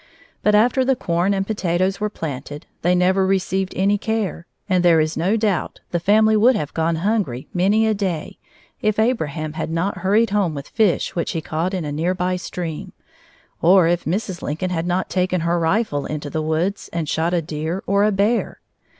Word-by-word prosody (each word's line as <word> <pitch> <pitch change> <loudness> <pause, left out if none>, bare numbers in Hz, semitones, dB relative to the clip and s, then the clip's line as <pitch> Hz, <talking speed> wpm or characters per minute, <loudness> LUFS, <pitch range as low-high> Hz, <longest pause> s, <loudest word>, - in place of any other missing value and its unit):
But 210 - +3
after 245 +5 +4
the 265 +1 +2
corn 175 -3 0
and 195 -1 0
potatoes 190 -2 0
were 210 0 -1
planted, 145 -5 -6 0.2
they 175 +2 +3
never 185 +2 +3
received 190 0 0
any 200 +2 +2
care, 215 -6 -2 0.2
and 185 -3 +2
there 170 -2 +5
is 155 +1 0
no 195 +7 +1
doubt 210 -4 -1
the 175 - 0
family 215 +4 +4
would 235 +4 +5
have 150 -8 -3
gone 165 +1 0
hungry 200 - -1
many 200 +5 +3
a 220 - +2
day 190 -6 -3 0.4
if 215 -1 +1
Abraham 160 - -1
had 160 0 -4
not 170 +5 -1
hurried 205 +3 +2
home 195 -6 +1
with 140 0 -7
fish 205 -3 +1
which 170 - -2
he 165 - -1
caught 165 +5 -2
in 175 -4 -3
a 145 - -3
near 165 +5 -1
by 180 0 0
stream, 180 0 -5 0.7
or 180 +1 +6
if 175 0 0
Mrs. 185 +1 -2
Lincoln 165 +5 -3
had 165 -1 -2
not 180 +1 0
taken 185 -1 0
her 170 +1 +1
rifle 165 -4 0
into 150 -1 -5
the 155 - -1
woods 160 +6 -1
and 165 -2 -3
shot 160 +3 0
a - - +2
deer 160 +4 -4
or 200 +1 +2
a 215 - +3
bear. 205 +4 0
185 Hz, 195 wpm, -21 LUFS, 165-205 Hz, 0.7 s, or